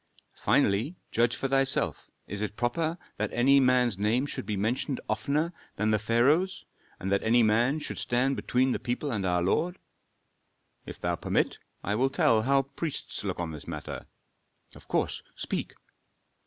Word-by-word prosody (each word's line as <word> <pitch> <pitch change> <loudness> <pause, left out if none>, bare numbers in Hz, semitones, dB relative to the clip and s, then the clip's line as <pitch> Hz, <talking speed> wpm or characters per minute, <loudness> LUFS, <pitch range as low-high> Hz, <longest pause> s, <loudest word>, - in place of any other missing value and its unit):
Finally, 110 - +2 0.2
judge 120 +1 +2
for 135 - -2
thyself, 135 0 +2 0.2
is 105 +1 -5
it 105 -1 -3
proper 160 +8 0 0.2
that 105 - -1
any 135 +3 +5
man's 125 -5 +3
name 115 +6 +2
should 125 - -5
be 105 -2 -1
mentioned 120 +6 -1
oftener 145 +10 0 0.2
than 110 +1 +1
the 110 - +3
pharaoh's, 140 - +2 0.3
and 95 - -3
that 100 - +2
any 115 +2 +4
man 115 +7 +3
should 155 - -5
stand 125 +3 +1
between 130 +1 +1
the - - -1
people 125 +4 -2
and 100 -5 -1
our 90 -1 +1
lord? 165 - +1 1.1
If - - -8
thou - - -1
permit, - - 0 0.2
I 100 - -1
will 130 +5 +2
tell 115 -4 +3
how 135 +4 +3
priests 140 -1 -4
look 95 -4 -3
on 85 -2 -2
this 75 -2 -9
matter." - - -6 0.7
"Of - - -15
course, - - 0
speak." - - -4
120 Hz, 165 wpm, -28 LUFS, 105-135 Hz, 1.1 s, any